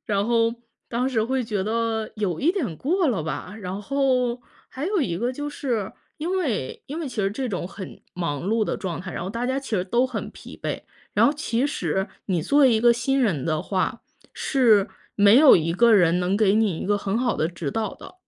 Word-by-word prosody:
然 205 -1 0
后， 230 0 +2 0.3
当 245 +2 -1
时， 235 -5 +1
会 255 +2 -1
觉 210 -4 -2
得 225 0 -1
有 185 -6 -2
一 315 - +3
点 305 - -2
过 345 +5 +1
了 205 -11 0
吧， 180 +4 -5
然 190 +2 -5
后， 255 -1 +1 0.3
还 280 +5 -4
有 405 -1 0
一 175 -8 -2
个 240 +3 0
就 290 +3 -5
是， 240 -8 -2 0.2
因 350 +5 -1
为 230 - -2
因 300 +4 -5
为 320 - -3
其 250 - -8
实 195 -1 +1
这 260 +5 -3
种 185 -5 -3
很 195 -2 -9
忙 165 -5 -3
碌 225 0 +2
的 - - -2
状 180 -4 -4
态， 180 0 -7
然 - - -4
后 185 - -4
大 230 +4 -3
家 260 +2 0
其 270 -6 -3
实 180 - 0
都 240 +7 +2
很 245 -3 -5
疲 - - -12
惫， - - -2 0.3
然 - - +4
后， - - +4
其 280 -4 -1
实， 190 - -2 0.2
你 180 -4 0
作 285 - +2
为 260 -4 +6
一 220 - +2
个 240 0 +5
新 270 +3 0
人 175 - +1
的 155 -1 0
话， 195 +5 -1 0.3
是 225 -8 +3 0.3
没 205 +3 +6
有 290 -1 +8
一 165 -1 +2
个 230 +7 +4
人， 175 -3 +5
能 180 +2 0
给 205 -1 +3
你 215 -7 +2
一 - - -4
个 205 - +2
很 205 +2 -1
好 245 -2 0
的 155 - +1
指 170 -4 -4
导 220 +1 -2
的。 - - -13
225 Hz, 245 characters per minute, -24 LUFS, 190-260 Hz, 0.3 s, 有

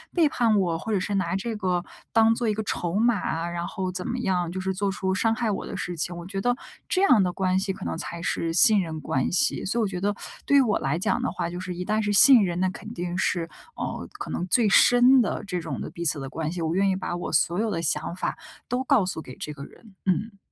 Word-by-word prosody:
背 335 -3 +5
叛 230 -6 +2
我， 170 -4 0
或 225 - -5
者 205 - +2
是 205 +2 -3
拿 185 -2 0
这 220 +4 -3
个 180 -2 -1 0.3
当 225 0 +5
做 230 0 -1
一 210 - 0
个 220 - -3
筹 175 -3 -3
码， 205 -7 +1
然 175 0 -4
后 185 0 -3
怎 180 0 -5
么 245 - -2
样， 180 -7 -1
就 190 - -4
是 190 0 -2
做 195 +1 -1
出 190 -1 -2
伤 225 +4 +1
害 230 -2 -1
我 200 - -4
的 200 - -6
事 175 -1 -4
情， 170 +2 -3
我 170 - -8
觉 195 +1 -4
得 245 +3 +1 0.3
这 370 - +1
样 255 - +6
的 180 - 0
关 185 0 +1
系 195 0 -2
可 - - -10
能 85 -1 -3
才 170 - -6
是 165 -1 -1
信 205 +4 +6
任 160 -3 -5
关 130 -2 -1
系。 275 +9 +1
所 230 +5 -1
以 - - +3
我 215 - +1
觉 185 -2 -4
得 205 +2 0 0.3
对 285 - +4
于 - - +7
我 225 -6 +1
来 140 +4 -1
讲 175 - 0
的 - - -1
话， 170 -1 -3
就 175 +1 -6
是 180 -1 -5
一 180 - -4
旦 215 +2 +1
是 205 -1 0
信 250 +2 +8
任， 175 -1 -2
那 185 0 +2
肯 210 +4 -9
定 175 -1 -4
是 170 -2 0 0.3
呃， - - -5
可 405 0 -7
能 180 - -2
最 215 +4 +3
深 245 +6 +6
的 225 - -2
这 180 -3 -3
种 160 -5 -5
的 - - -5
彼 170 - -6
此 150 -2 +1
的 135 -1 -6
关 155 +2 -3
系， 175 0 -5
我 160 0 -1
愿 195 +1 +3
意 190 - +1
把 185 -2 -4
我 175 - -4
所 175 +3 +2
有 225 +1 0
的 165 -4 -2
想 170 +1 -1
法 185 - -3 0.3
都 250 +2 -1
告 260 -7 +3
诉 180 -3 -4
给 130 -4 -11
这 150 - -6
个 140 -1 -9
人， 220 -4 -17
嗯。 200 +3 -1
190 Hz, 295 characters per minute, -25 LUFS, 175-220 Hz, 0.3 s, 信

